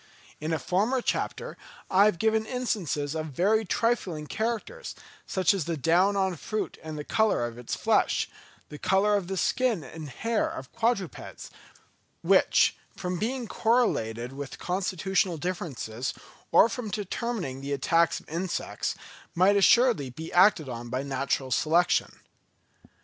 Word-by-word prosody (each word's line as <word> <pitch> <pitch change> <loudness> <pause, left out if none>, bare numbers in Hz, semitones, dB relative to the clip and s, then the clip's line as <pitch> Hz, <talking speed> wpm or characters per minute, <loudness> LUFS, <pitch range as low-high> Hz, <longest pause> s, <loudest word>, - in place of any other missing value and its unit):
In 155 +2 -3
a 160 - +1
former 210 - +1
chapter - - -2 0.3
I 195 +2 +5
have 210 -5 +2
given 220 +3 +2
instances 185 - -2
of 160 0 -3
very 200 +10 +2
trifling 190 -7 -1
characters, 235 - -3 0.3
such 185 0 +2
as 190 -7 -2
the 165 -1 -2
down 175 +8 +3
on 190 -3 0
fruit 215 +7 -4
and 155 -1 -7
the 150 - -4
colour 220 - +2
of 120 0 -7
its 120 - -4
flesh, - - +2 0.4
the 150 - -9
colour 205 +2 +3
of 195 -4 -1
the 190 0 -3
skin 240 - +1
and 150 +3 -8
hair 230 - -1
of 325 0 -8
quadrupeds, 230 -6 -2 0.7
which, - - +4 0.2
from 180 -1 -3
being 240 +2 -2
correlated 125 - 0
with 140 -1 -7
constitutional 185 0 0
differences, 145 -9 -4 0.4
or - - +7
from 235 -1 -5
determining 200 - -3
the 140 +1 -5
attacks 165 +4 +2
of - - -21
insects, 170 +4 -3 0.4
might 185 +4 +5
assuredly 215 - +4
be 160 +6 -8
acted 180 -4 +5
on 120 -1 -6
by 130 +3 -2
natural 135 -1 -2
selection. 165 +7 +2
180 Hz, 145 wpm, -27 LUFS, 150-220 Hz, 0.7 s, or